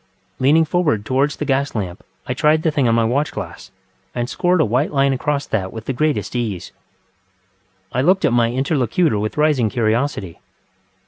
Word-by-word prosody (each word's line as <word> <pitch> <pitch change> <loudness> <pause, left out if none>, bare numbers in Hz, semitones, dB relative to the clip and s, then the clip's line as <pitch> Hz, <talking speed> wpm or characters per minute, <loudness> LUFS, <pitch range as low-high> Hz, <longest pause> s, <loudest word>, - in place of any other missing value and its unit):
Leaning 150 +5 +4
forward 155 - 0
towards 135 +4 +1
the 150 - -4
gas 140 -1 0
lamp, 95 -5 -4 0.2
I 125 - -2
tried 150 +4 +2
the 160 - +2
thing 140 -4 +1
on 115 - +3
my 115 - +3
watch 135 +6 0
glass, 95 -5 -7 0.5
and 120 -1 -1
scored 180 +6 +1
a 155 - +4
white 125 +7 0
line 135 -1 +2
across 140 +2 -1
that 95 -4 -2
with 110 -1 -8
the 135 - -2
greatest 125 -7 -1
ease. 110 -7 -3 1.2
I 125 - 0
looked 180 +4 +3
at 135 - +2
my 120 -1 +3
interlocutor 135 - +1
with 110 +6 -3
rising 150 -7 +2
curiosity. 110 -4 -1
130 Hz, 180 wpm, -19 LUFS, 115-150 Hz, 1.2 s, Leaning